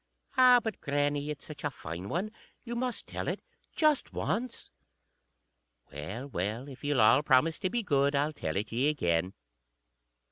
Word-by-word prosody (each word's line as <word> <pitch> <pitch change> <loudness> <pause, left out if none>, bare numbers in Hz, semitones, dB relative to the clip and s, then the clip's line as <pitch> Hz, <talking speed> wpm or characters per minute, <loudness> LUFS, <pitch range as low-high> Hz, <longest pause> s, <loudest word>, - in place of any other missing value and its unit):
"_ - - -48 0.3
"Ah! 255 -2 +7
but, 220 -2 -5
grannie, 145 +1 0
it's 150 -1 -5
such 155 - -10
a 145 - +1
fine 90 - -7
one. 195 +6 -2 0.3
You 240 -1 -5
must 245 -1 -2
tell - - -5
it. - - -1 0.4
Just 305 -3 +2
once." 240 +4 -3 1.2
_"Well, 95 - -5
well, 110 +3 -3
if 135 -2 -11
ye'll 145 -4 +2
all 120 +6 +6
promise 150 +3 +3
to 185 - 0
be 240 +2 -1
good, 140 -4 +2
I'll 145 +2 +1
tell 80 - -4
it 105 +3 -2
ye 125 +6 +2
again." 90 - 0
145 Hz, 170 wpm, -30 LUFS, 115-195 Hz, 1.2 s, Ah